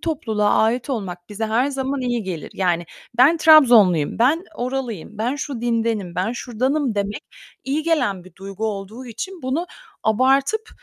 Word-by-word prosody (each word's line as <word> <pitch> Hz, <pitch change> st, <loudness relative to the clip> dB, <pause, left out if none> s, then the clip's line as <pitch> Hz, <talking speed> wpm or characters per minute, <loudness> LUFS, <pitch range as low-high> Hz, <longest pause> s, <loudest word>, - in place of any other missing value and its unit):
topluluğa 225 Hz, -11 st, 0 dB
ait 240 Hz, +5 st, +1 dB
olmak 180 Hz, -7 st, -5 dB
bize 215 Hz, +2 st, -3 dB
her 230 Hz, +4 st, +1 dB
zaman 270 Hz, 0 st, -2 dB
iyi 240 Hz, -3 st, -1 dB
gelir. 180 Hz, -5 st, -6 dB
Yani, 175 Hz, -2 st, 0 dB, 0.3 s
"Ben 295 Hz, +7 st, +6 dB
Trabzonlu'yum. 235 Hz, -, +6 dB
Ben 300 Hz, +10 st, +3 dB
oralıyım. 245 Hz, -, -4 dB
Ben 240 Hz, +6 st, -1 dB
şu 275 Hz, -4 st, -5 dB
dindenim. 225 Hz, -6 st, -1 dB
Ben 185 Hz, +6 st, -1 dB
şuradanım" 255 Hz, +2 st, -1 dB
demek, 205 Hz, 0 st, -2 dB, 0.4 s
iyi 285 Hz, +4 st, -1 dB
gelen 210 Hz, -, 0 dB
bir 185 Hz, -, -15 dB
duygu 195 Hz, +2 st, -5 dB
olduğu 215 Hz, +4 st, -6 dB
için 370 Hz, -, -7 dB
bunu 280 Hz, +7 st, -1 dB, 0.4 s
abartıp, 270 Hz, -, +2 dB
235 Hz, 150 wpm, -21 LUFS, 205-270 Hz, 0.4 s, Ben